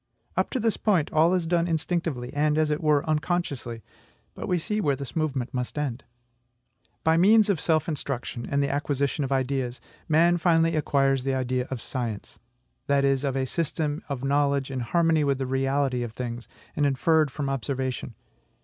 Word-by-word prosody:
Up - - +1
to 260 - -2
this 225 -1 +1
point, 185 -9 +1
all 165 +3 +4
is 180 -2 0
done 170 0 +1
instinctively, 160 -6 -2
and, 150 +1 +1
as 155 -1 +2
it 150 - -1
were, 150 0 +2
unconsciously; 150 -8 -2 0.5
but - - -6
see 210 +6 -2
where 145 -6 +2
this 135 -2 -8
movement 140 -6 -1
must 125 +2 -3
end. 140 -4 -2 1.0
By 160 +1 +4
means 210 +4 +5
of 190 -6 +2
self 160 -2 +1
instruction 135 -6 -4
and 140 0 +1
the 140 - 0
acquisition 140 0 -1
of 135 - -3
ideas, 130 -2 -1 0.3
man 170 +3 +4
finally 165 -1 +3
acquires 135 -3 +2
the 135 0 0
idea 130 0 -1
of 130 - -4
SCIENCE, 115 -4 -5 0.5
that 140 -1 +3
is, 135 0 +2
of 135 -2 -1
a 130 - 0
system 155 0 -2
of 135 -2 -4
knowledge 140 -1 +1
in 130 - -3
harmony 160 +5 +2
with 140 -2 +1
the 135 - -2
reality 135 0 0
of 120 -2 -4
things, 120 -1 -5 0.3
and 145 - +2
inferred 155 +3 +2
from 140 +1 -4
observation. 130 -3 -3
140 Hz, 175 wpm, -26 LUFS, 130-160 Hz, 1.0 s, means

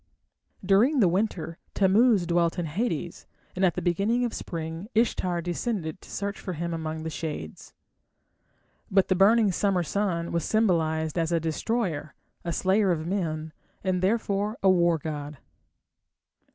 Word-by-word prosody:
During 225 +10 +4
the 200 - +5
winter 175 -3 -1 0.2
Tammuz 200 0 +4
dwelt 170 0 +1
in 175 - -1
Hades, 170 0 -3 0.3
and 185 - -1
at 175 -3 +3
the - - -3
beginning 205 +8 +1
of 235 - -3
spring 165 +2 -5
Ishtar 180 -6 +1
descended 175 -2 -3
to - - -15
search 200 +1 -4
for 185 - -5
him 170 +1 -3
among 160 -1 -4
the 160 - -4
shades. 150 - -6 1.1
But 195 -1 +3
the 185 - +3
burning 205 +2 +5
summer 185 -1 +1
sun 170 -2 -1
was 170 -2 0
symbolized 160 -7 +1
as 165 0 0
a 170 - +2
destroyer, 165 -1 -2 0.3
a 170 - -2
slayer 195 +4 +2
of 160 -3 0
men, 160 -4 -2 0.3
and 185 -2 0
therefore 205 +1 0
a 190 - +6
war 170 -2 +3
god. 150 -1 -6
175 Hz, 150 wpm, -27 LUFS, 165-200 Hz, 1.1 s, a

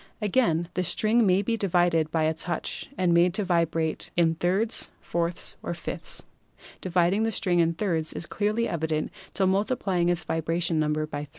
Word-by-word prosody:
Again, 195 -6 +1
the 180 - 0
string 215 +5 +2
may 190 +2 +3
be 230 +3 0
divided 175 -6 +2
by 160 0 0
a 155 +1 +2
touch 165 +1 -3
and 180 -2 +2
made 175 +1 +4
to 210 - +1
vibrate 165 -3 0
in 165 -2 +4
thirds 190 +7 0
or - - -30
fourths 170 0 -2
or - - -4
fifths. - - -4 0.6
Dividing 180 +2 +2
the 225 0 +1
string 180 -5 +1
in 165 0 +2
thirds 165 -4 -1
is - - -5
clearly 215 +5 0
equivalent 160 -4 -2 0.2
to 195 - +3
multiplying 190 -3 +1
its 175 -1 0
vibration 165 +1 0
number 155 0 0
by 145 -1 -5
3. - - -23
175 Hz, 180 wpm, -26 LUFS, 165-195 Hz, 0.6 s, made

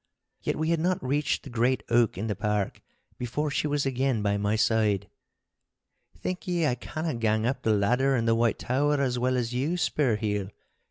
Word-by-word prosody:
Yet - - -1
we 160 +2 0
had 165 - +2
not 180 0 0
reached 145 +2 0
the 135 - -9
great 120 -1 +1
oak 115 -5 +3
in 100 - -2
the 105 -2 -1
park 105 -1 -1 0.4
before 140 +5 -2
she 150 - 0
was 145 -1 0
again 130 -4 0
by 100 0 +1
my 105 +1 0
side. 105 -3 +2 1.1
'Think 185 +2 -4
ye 175 -2 +1
I 145 - +2
canna 155 +6 -4
gang 110 -1 +1
up 130 +1 -1
the 110 - +1
ladder 125 +7 +2
in 115 -2 0
the 115 - +3
White 115 0 +2
Tower 145 +3 +1
as 125 -3 0
well 130 +1 +1
as 120 -1 -2
you, 145 +8 0
Spurheel. 105 - 0
125 Hz, 195 wpm, -27 LUFS, 110-145 Hz, 1.1 s, oak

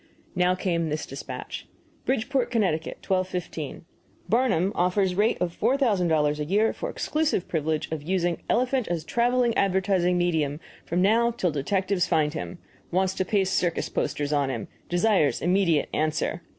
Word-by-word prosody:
Now 180 0 +3
came 170 -3 -1
this 150 +1 -2
despatch: - - -7 0.4
BRIDGEPORT, 260 0 0
CT., 230 -3 +2 0.4
12.15. 180 -5 -3 0.4
Barnum 220 -6 +2
offers 185 0 +1
rate 210 +5 +2
of 170 -1 -2
$4,000 180 - +2
a - - 0
year 205 +8 +2
for - - -5
exclusive 305 - -1
privilege 160 -1 -1
of 160 -2 -3
using 175 +1 -1
elephant 255 0 +1
as 170 -2 -2
traveling 240 +4 +1
advertising 185 -2 +2
medium 160 -5 0 0.3
from 175 +2 +1
now 230 +4 +4
till 225 -7 -1
detectives 185 +5 0
find 150 -1 +1
him. 170 +3 -5 0.3
Wants 190 +1 +1
to 190 - -1
paste 190 -1 +1
circus 175 -2 0
posters 145 0 -2
on 140 -2 +1
him. 120 -5 -4 0.2
Desires 175 -4 +2
immediate 175 -4 +2
answer. 155 +2 -1
180 Hz, 145 wpm, -26 LUFS, 160-210 Hz, 0.4 s, now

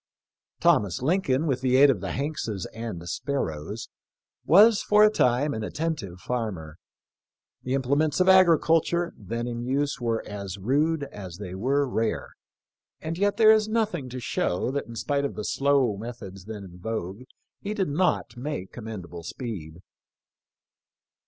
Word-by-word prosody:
Thomas 100 +3 +2
Lincoln, 155 -3 +1
with 135 -5 0
the 130 -1 +2
aid 140 +1 +7
of 105 -9 -3
the 100 - -3
Hankses 135 - -3
and 110 -7 -6
Sparrows, 105 - -3 0.6
was 205 +5 +6
for 210 0 +5
a 215 - +6
time 135 - +2
an 110 - -4
attentive 120 - -3
farmer. 95 -11 -4 0.8
The 130 +1 -1
implements 140 +4 +1
of 185 - +3
agriculture 170 -2 +4
then 115 +4 -4
in 120 -1 -4
use 140 +3 -1
were 115 -1 -1
as 100 -2 -6
rude 145 +9 +1
as 95 -10 -8
they 95 -3 -7
were 135 +8 +1
rare, 115 -3 -1 0.7
and 160 +1 -4
yet 200 +3 +1
there 220 -1 +7
is 215 -1 +3
nothing 215 - -1
to 130 +1 -6
show 110 -2 -1
that 140 +1 -3
in 115 - -9
spite 140 +4 -1
of 140 - -3
the 105 - -5
slow 135 -6 +2
methods 100 -4 -8
then 105 -2 -7
in 90 -2 -12
vogue 100 0 -4 0.4
he 210 +1 -4
did 190 -7 0
not 180 0 0
make 120 -7 -5
commendable 100 -7 -7
speed. 85 - -7
125 Hz, 150 wpm, -26 LUFS, 105-150 Hz, 0.8 s, aid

